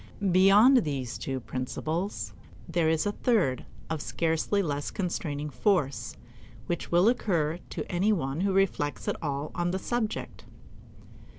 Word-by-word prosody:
Beyond 200 Hz, +8 st, +7 dB
these 140 Hz, -, -1 dB
two 135 Hz, -1 st, -3 dB
principles 155 Hz, -, -3 dB, 0.3 s
there 165 Hz, -2 st, +1 dB
is 160 Hz, +2 st, +1 dB
a 205 Hz, -, +1 dB
third 200 Hz, -, +1 dB, 0.2 s
of 160 Hz, -2 st, -3 dB
scarcely 165 Hz, +6 st, 0 dB
less 145 Hz, -3 st, -2 dB
constraining 150 Hz, -5 st, -3 dB
force, 140 Hz, -, 0 dB, 0.5 s
which 170 Hz, +5 st, -3 dB
will 175 Hz, +4 st, +5 dB
occur 175 Hz, -9 st, +1 dB
to -, -, -4 dB
any 185 Hz, +5 st, +2 dB
one 155 Hz, -5 st, -1 dB
who 195 Hz, 0 st, +2 dB
reflects 190 Hz, -6 st, 0 dB
at -, -, +1 dB
all 145 Hz, -1 st, -3 dB
on 175 Hz, 0 st, -1 dB
the 185 Hz, -, -1 dB
subject. 220 Hz, +2 st, -3 dB
170 Hz, 135 wpm, -28 LUFS, 145-195 Hz, 0.5 s, Beyond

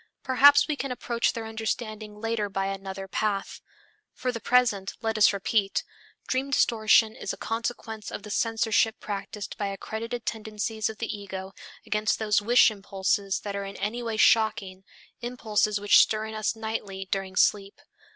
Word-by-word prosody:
Perhaps 285 Hz, +2 st, +6 dB
we 305 Hz, -, 0 dB
can 275 Hz, -2 st, -4 dB
approach 235 Hz, -1 st, -1 dB
their 230 Hz, -1 st, -5 dB
understanding 220 Hz, -1 st, -4 dB
later 225 Hz, -2 st, -1 dB
by 195 Hz, 0 st, -2 dB
another 195 Hz, 0 st, -5 dB
path. 200 Hz, 0 st, -2 dB, 0.5 s
For 255 Hz, 0 st, -2 dB
the 230 Hz, -, -5 dB
present, 225 Hz, -6 st, +2 dB
let 225 Hz, 0 st, 0 dB
us 215 Hz, -1 st, +6 dB
repeat: 200 Hz, 0 st, 0 dB, 0.4 s
dream 265 Hz, +2 st, -1 dB
distortion 220 Hz, -4 st, +4 dB
is -, -, -4 dB
a -, -, -9 dB
consequence 225 Hz, -1 st, -4 dB
of -, -, -7 dB
the 210 Hz, -, -8 dB
censorship 225 Hz, 0 st, +1 dB
practised 205 Hz, 0 st, -6 dB
by 205 Hz, -, -1 dB
accredited 225 Hz, +4 st, -5 dB
tendencies 220 Hz, 0 st, -3 dB
of 220 Hz, -, -8 dB
the 230 Hz, -1 st, -3 dB
ego 190 Hz, -1 st, -7 dB, 0.3 s
against 215 Hz, 0 st, 0 dB
those 210 Hz, -1 st, +2 dB
wish 235 Hz, +2 st, +5 dB
impulses 195 Hz, -1 st, -1 dB
that 200 Hz, -1 st, -5 dB
are 200 Hz, -, -3 dB
in 195 Hz, 0 st, -7 dB
any 225 Hz, +4 st, -3 dB
way 225 Hz, -2 st, -3 dB
shocking, 210 Hz, -4 st, +3 dB, 0.4 s
impulses 215 Hz, -4 st, 0 dB
which 205 Hz, 0 st, +6 dB
stir 215 Hz, 0 st, +3 dB
in 220 Hz, -, -7 dB
us 215 Hz, +1 st, -1 dB
nightly 210 Hz, -3 st, -5 dB
during 190 Hz, -1 st, -2 dB
sleep. 200 Hz, +3 st, +2 dB
215 Hz, 160 wpm, -27 LUFS, 200-230 Hz, 0.5 s, Perhaps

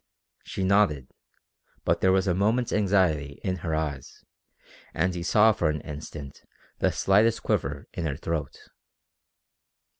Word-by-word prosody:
She 95 Hz, -, -4 dB
nodded, 95 Hz, -9 st, +2 dB, 0.7 s
but -, -, +1 dB
there 95 Hz, -, +4 dB
was 95 Hz, 0 st, +2 dB
a 90 Hz, -, +2 dB
moment's 110 Hz, +6 st, +1 dB
anxiety 90 Hz, -9 st, +1 dB
in 95 Hz, -1 st, -1 dB
her 80 Hz, -2 st, -2 dB
eyes, 75 Hz, -4 st, -5 dB, 0.7 s
and 90 Hz, +3 st, +1 dB
he 90 Hz, -, -4 dB
saw 105 Hz, +5 st, +5 dB
for 85 Hz, -7 st, 0 dB
an 75 Hz, -1 st, -2 dB
instant 75 Hz, -2 st, -8 dB, 0.4 s
the -, -, +2 dB
slightest 105 Hz, +4 st, +2 dB
quiver 70 Hz, +1 st, -1 dB
in 85 Hz, -2 st, -3 dB
her 70 Hz, -2 st, -3 dB
throat. 75 Hz, -4 st, -4 dB
85 Hz, 140 wpm, -26 LUFS, 75-100 Hz, 0.7 s, saw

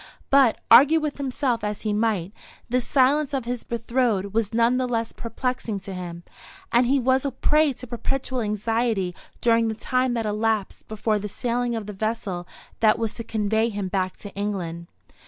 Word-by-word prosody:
But, 270 Hz, -4 st, +5 dB
argue 290 Hz, +7 st, +8 dB
with 300 Hz, -2 st, -3 dB
himself 260 Hz, -4 st, -1 dB
as 210 Hz, 0 st, -3 dB
he 215 Hz, -2 st, 0 dB
might, 210 Hz, -4 st, 0 dB, 0.3 s
this 245 Hz, 0 st, 0 dB
silence 280 Hz, +2 st, +3 dB
of 260 Hz, -3 st, -2 dB
his 245 Hz, 0 st, -3 dB
betrothed 230 Hz, -4 st, -1 dB
was 220 Hz, -2 st, 0 dB
none 235 Hz, +2 st, +3 dB
the 255 Hz, 0 st, 0 dB
less 230 Hz, -2 st, -1 dB
perplexing 230 Hz, -2 st, -3 dB
to 195 Hz, 0 st, -7 dB
him, 175 Hz, -2 st, -7 dB, 0.5 s
and 240 Hz, +1 st, +4 dB
he 275 Hz, +2 st, +3 dB
was 260 Hz, +1 st, +2 dB
a 280 Hz, -, 0 dB
prey 300 Hz, +3 st, +2 dB
to 255 Hz, -, -9 dB
perpetual 255 Hz, +1 st, -2 dB
anxiety 215 Hz, -2 st, 0 dB, 0.3 s
during 230 Hz, -1 st, +3 dB
the 220 Hz, -, -2 dB
time 255 Hz, +2 st, 0 dB
that 230 Hz, -1 st, -1 dB
elapsed 215 Hz, -1 st, -1 dB
before 215 Hz, 0 st, 0 dB
the 210 Hz, +1 st, -5 dB
sailing 240 Hz, +2 st, -1 dB
of 220 Hz, -2 st, -4 dB
the 210 Hz, -, -6 dB
vessel 195 Hz, -4 st, -3 dB, 0.3 s
that 220 Hz, 0 st, +4 dB
was 225 Hz, -1 st, -2 dB
to 230 Hz, -, -6 dB
convey 220 Hz, +1 st, 0 dB
him 200 Hz, -3 st, -3 dB
back 185 Hz, -1 st, -1 dB
to 205 Hz, -, -9 dB
England. 180 Hz, -5 st, -4 dB
230 Hz, 180 wpm, -24 LUFS, 210-250 Hz, 0.5 s, argue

